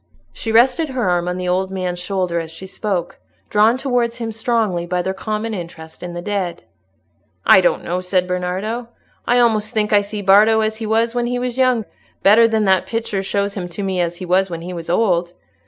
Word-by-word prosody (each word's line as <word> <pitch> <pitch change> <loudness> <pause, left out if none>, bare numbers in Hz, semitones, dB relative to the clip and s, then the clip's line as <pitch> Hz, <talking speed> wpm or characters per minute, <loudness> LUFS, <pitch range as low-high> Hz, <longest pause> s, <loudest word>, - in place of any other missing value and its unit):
She 225 - -4
rested 260 +7 +4
her 250 -6 -1
arm 175 -1 +1
on 180 0 -2
the 180 0 -3
old 185 +1 0
man's 185 -2 -3
shoulder 180 -2 -1
as 165 -1 -6
she 165 +4 -9
spoke, 190 -2 -3 0.3
drawn 215 +4 +4
towards 245 -3 0
him 230 -2 -4
strongly 220 -6 0
by 180 0 -1
their 190 - -2
common 215 +3 -3
interest 165 -4 -8
in 175 -1 -6
the 175 - -5
dead. 195 -4 -3 0.8
"I 190 - +7
don't 180 - +1
know," 180 +2 -2
said 180 0 +1
Bernardo. 185 +6 -3 0.4
"I 245 - +3
almost 220 -3 +2
think 210 -1 +1
I 205 - +6
see 205 0 -6
Bardo 210 +3 +5
as 220 0 -1
he 220 -1 -5
was 225 +2 +1
when 240 -1 -1
he 245 +1 -1
was 245 -1 -3
young, 250 -4 +2 0.4
better 220 +4 +6
than 220 -2 +1
that 190 -1 +2
picture 225 -4 -2
shows 200 +1 -1
him 185 -3 -4
to 200 +4 -6
me 190 -2 -1
as 170 0 -1
he 185 - -7
was 185 +2 +2
when 165 -1 -5
he 180 +2 -6
was 170 -1 -7
old. 175 -3 +1
200 Hz, 215 wpm, -19 LUFS, 180-225 Hz, 0.8 s, I